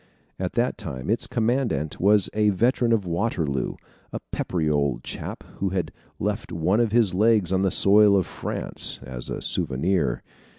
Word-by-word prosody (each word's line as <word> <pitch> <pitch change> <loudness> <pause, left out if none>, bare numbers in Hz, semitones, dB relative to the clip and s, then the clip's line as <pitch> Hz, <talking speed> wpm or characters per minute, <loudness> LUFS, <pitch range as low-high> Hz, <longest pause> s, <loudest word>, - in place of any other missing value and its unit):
At - - -3
that - - 0
time, 65 +9 -4
its 115 - +2
commandant 120 - -1
was 100 0 +5
a 105 0 +3
veteran 120 +4 +2
of 110 -4 +2
Waterloo, 85 - -1 0.4
a - - -4
peppery 85 -4 -2
old 70 -3 0
chap - - -6
who 95 - -1
had 90 -4 -2 0.3
left 105 +2 -3
one 90 +6 +1
of 115 -3 +2
his 110 -5 +3
legs 105 -2 +3
on 95 - +2
the 95 - +2
soil 100 +1 +5
of 95 - +1
France, - - -4
as 65 -2 -5
a - - -4
souvenir. 85 +4 0
95 Hz, 165 wpm, -24 LUFS, 80-110 Hz, 0.4 s, was